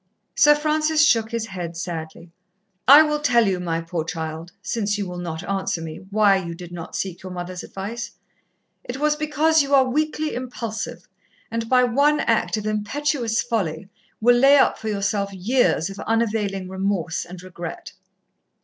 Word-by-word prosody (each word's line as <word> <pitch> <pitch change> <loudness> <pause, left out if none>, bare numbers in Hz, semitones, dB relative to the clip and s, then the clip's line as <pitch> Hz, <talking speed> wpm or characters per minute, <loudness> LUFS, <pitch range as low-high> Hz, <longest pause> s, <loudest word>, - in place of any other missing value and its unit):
Sir 295 0 +6
Francis 305 +1 +2
shook 225 -7 +3
his 230 -1 -2
head 175 -5 -6
sadly. 165 -1 -6 0.6
"I 285 +4 +10
will 300 -1 0
tell 245 -5 +3
you, 185 -2 0
my 165 -2 -2
poor 165 -1 -3
child, 160 +1 -5
since 205 0 -1
you 200 -2 -3
will 180 0 -6
not 165 -2 -5
answer 195 -3 -1
me, 165 +3 -8
why 205 -1 +4
you 170 -3 -5
did 175 0 -10
not 170 -1 -8
seek 185 -3 -4
your 185 - -8
mother's 180 0 -6
advice. 230 +5 -6 0.7
It 245 - -6
was 300 0 +2
because 305 +1 +2
you 280 0 +2
are 265 -1 +5
weakly 305 +3 -1
impulsive, 235 -3 -5 0.4
and 230 0 -3
by 255 -1 +5
one 280 +5 +3
act 225 -1 +1
of 215 - -5
impetuous 230 +3 -1
folly 190 -7 -2 0.3
will 240 +2 +5
lay 275 +3 +6
up - - +3
for 220 - -6
yourself 200 -1 -1
years 195 -2 +1
of 195 - -10
unavailing 210 -4 -1
remorse 190 -3 -2
and 180 +1 -11
regret." 175 -2 -8
210 Hz, 165 wpm, -22 LUFS, 180-255 Hz, 0.7 s, I